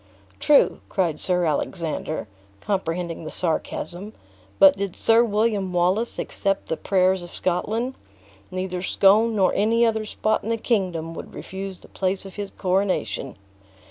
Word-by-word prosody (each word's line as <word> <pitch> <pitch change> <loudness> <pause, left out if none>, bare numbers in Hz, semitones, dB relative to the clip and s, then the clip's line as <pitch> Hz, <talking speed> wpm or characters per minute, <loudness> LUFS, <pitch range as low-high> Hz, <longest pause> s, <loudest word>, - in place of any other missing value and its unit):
"True," 295 -2 +4
cried 170 -6 0
Sir 180 -2 +2
Alexander, 155 -2 -2 0.3
comprehending 175 - -2
the 155 - -5
sarcasm; 175 +4 -3 0.4
"but 190 -1 +7
did 195 -2 -4
Sir 230 +1 +4
William 210 -3 0
Wallace 185 +7 +1
accept 195 -1 -2
the - - 0
prayers 185 +1 +2
of 175 - -10
Scotland, 220 +8 -1 0.6
neither 185 -1 -3
Scone 210 +4 +4
nor 190 -3 +3
any 230 +3 +3
other 220 -1 0
spot 215 +1 0
in 220 - -5
the 230 - +1
kingdom 180 -8 -1
would - - -9
refuse 190 0 -6
the - - -17
place 190 0 -2
of 195 - -9
his 205 -1 -5
coronation." 185 - -1
190 Hz, 140 wpm, -23 LUFS, 175-215 Hz, 0.6 s, but